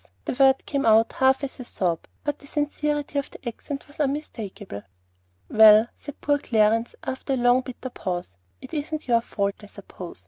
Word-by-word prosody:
The - - -1
word 265 +1 +4
came 280 -1 -1
out 225 0 +4
half 265 +1 +3
as 270 - -5
a - - -5
sob, 175 -8 -2 0.2
but 290 0 -2
the 285 - -15
sincerity 295 0 -1
of 280 - -5
the - - -11
accent 275 +5 -6
was 285 - -15
unmistakable. 225 - -4 0.7
"Well," 220 +1 +7
said 290 0 -10
poor 290 0 +2
Clarence, 225 -1 +2
after 265 +1 -3
a - - +1
long 245 +1 +4
bitter 255 0 -8
pause; 175 - -5 0.2
"it - - -11
isn't 305 0 -3
your 235 -2 +4
fault, 200 -3 -2
I 205 - -11
suppose. 185 - -10
255 Hz, 180 wpm, -25 LUFS, 215-285 Hz, 0.7 s, Well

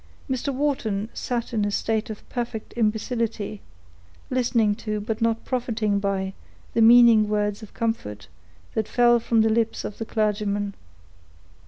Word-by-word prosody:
Mr. 265 +1 -1
Wharton 245 -7 -1
sat 240 -1 -3
in 215 -2 +1
a 205 - +1
state 220 +2 -1
of 215 - -8
perfect 235 -3 -5
imbecility, 220 -2 -1 0.7
listening 235 -4 +2
to, 215 0 -3
but 215 +2 -4
not 230 0 0
profiting 225 -5 0
by, 195 -1 -1 0.4
the 230 - +2
meaning 230 -2 +7
words 210 0 0
of 215 - -12
comfort 225 - -3 0.5
that 220 -1 -1
fell 240 -1 +4
from 230 -1 +2
the 220 - +3
lips 225 0 0
of 210 - -7
the 225 - -3
clergyman. 205 -2 -1
220 Hz, 145 wpm, -24 LUFS, 210-235 Hz, 0.7 s, meaning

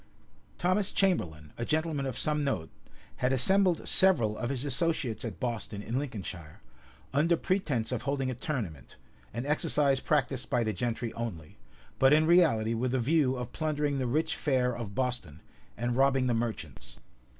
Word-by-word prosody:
Thomas 185 +3 +1
Chamberlain, 80 - 0
a - - -1
gentleman 155 0 -1
of 130 - -3
some 150 -1 +1
note, 105 - -2 0.5
had 125 0 +1
assembled 180 +7 +3
several 120 - +4
of 120 - -3
his 135 0 -3
associates 145 -4 0
at 115 -5 -6
Boston, 115 -4 -3
in 120 +5 -2
Lincolnshire, 95 - -7 0.5
under 165 +4 +3
pretence 150 - -1
of 125 - -2
holding 135 -2 -1
a - - -2
tournament, 110 - -5 0.4
an 120 +4 -4
exercise 145 -2 +2
practised 135 -3 0
by 125 -3 +2
the 110 -1 -1
gentry 115 +3 -3
only; 100 -10 -6 0.4
but 135 +2 +6
in 155 +1 +5
reality 155 -11 +4
with 125 +3 -1
a - - +2
view 135 +1 +2
of 125 -1 -6
plundering 150 -3 -1
the 130 - -1
rich 150 +7 0
fair 125 -4 +1
of 110 -4 -6
Boston, 125 - -2 0.4
and 120 0 -1
robbing 135 0 +3
the 125 - +1
merchants. 115 - -4
130 Hz, 160 wpm, -29 LUFS, 115-150 Hz, 0.5 s, but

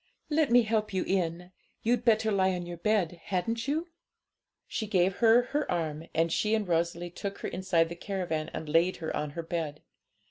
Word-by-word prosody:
Let 300 -1 +3
me 240 0 +6
help 215 -2 0
you 185 - +1
in; 180 -1 -1 0.3
you'd 235 +1 +2
better 220 -2 +3
lie 190 -2 +2
on 175 -1 -4
your 175 0 -6
bed, 175 -3 0
hadn't 225 +5 -1
you?' 315 +5 0 0.8
She 220 - -3
gave 190 -2 +2
her 235 +1 +6
her 295 +1 0
arm, 160 -2 -2
and 165 +1 +2
she 215 +5 +2
and 215 -3 -1
Rosalie 170 0 0
took 200 +2 -5
her - - -2
inside 180 -3 +1
the 170 - -7
caravan 175 -4 -3
and 160 - -6
laid 165 +4 +3
her 160 -2 -4
on 150 - -2
her 170 - -2
bed. 160 -3 -4
185 Hz, 190 wpm, -29 LUFS, 170-220 Hz, 0.8 s, me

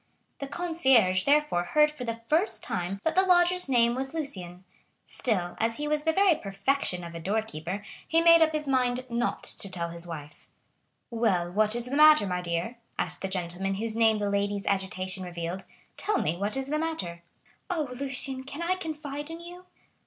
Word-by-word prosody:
The 275 - -4
concierge 265 - +2
therefore 290 -11 +3
heard 300 +11 +3
for 270 -5 -7
the 230 0 -4
first 335 - +1
time 180 +3 -3
that 320 - +1
the 375 - +5
lodger's 360 -3 +3
name 235 -2 +4
was 265 +4 -3
Lucien; 185 - -4 0.4
still, 185 -8 -1
as 230 0 0
he 295 - -3
was 300 0 0
the 320 - +4
very 385 +2 +4
perfection 195 - -1
of 170 0 -8
a 170 - -6
door 205 +6 0
keeper, 190 0 -6 0.2
he 325 - +3
made 335 0 +7
up 320 -1 +5
his 305 -1 -3
mind 255 -1 +1
not 235 +1 -1
to 195 - +1
tell 170 -2 -3
his 170 +1 -8
wife. 150 -3 -9 0.6
"Well, 190 -7 +1
what 215 +3 +2
is 240 0 -1
the 255 +3 -3
matter, 305 -5 +7
my 180 -2 -2
dear?" 175 +7 -3 0.2
asked - - -2
the 195 - -2
gentleman 190 +1 -2
whose 220 +2 -2
name 225 -1 +4
the 205 -1 -1
lady's 200 0 -1
agitation 190 -1 -2
revealed; 175 +1 -5 0.3
"tell 420 -1 0
me 160 - 0
what 205 +7 -2
is 270 0 -2
the 305 +1 0
matter." 190 - -3 0.5
"Oh, 320 -5 -1
Lucien, 265 0 -2
can 285 +5 -6
I 365 +2 0
confide 300 -3 -5
in 330 0 -7
you?" 355 +1 -11
235 Hz, 190 wpm, -28 LUFS, 185-300 Hz, 0.6 s, made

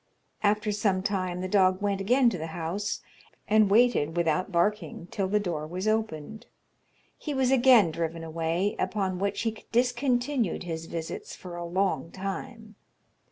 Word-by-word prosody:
After 210 0 +2
some 200 -3 0
time 185 -3 -1
the 185 - -2
dog 185 -1 +3
went 200 -1 -1
again 245 +6 +4
to 180 - -4
the 160 - -4
house, 175 +5 -3 0.5
and 215 -1 +4
waited 205 -8 +3
without 170 +3 +1
barking 175 -1 0
till 195 -2 -1
the 210 +2 +2
door 165 -6 -3
was 185 +5 -4
opened. 220 0 -2 0.7
He 295 -2 -4
was 260 -1 +2
again 245 -8 +6
driven 165 0 -3
away, 165 +4 -1
upon 190 -3 -1
which 200 +1 -1
he 225 -1 -3
discontinued 245 - +1
his 165 -2 -5
visits 165 -1 -6
for 180 -2 -9
a 175 - -5
long 185 -1 0
time. 215 +4 -6
195 Hz, 155 wpm, -27 LUFS, 170-220 Hz, 0.7 s, again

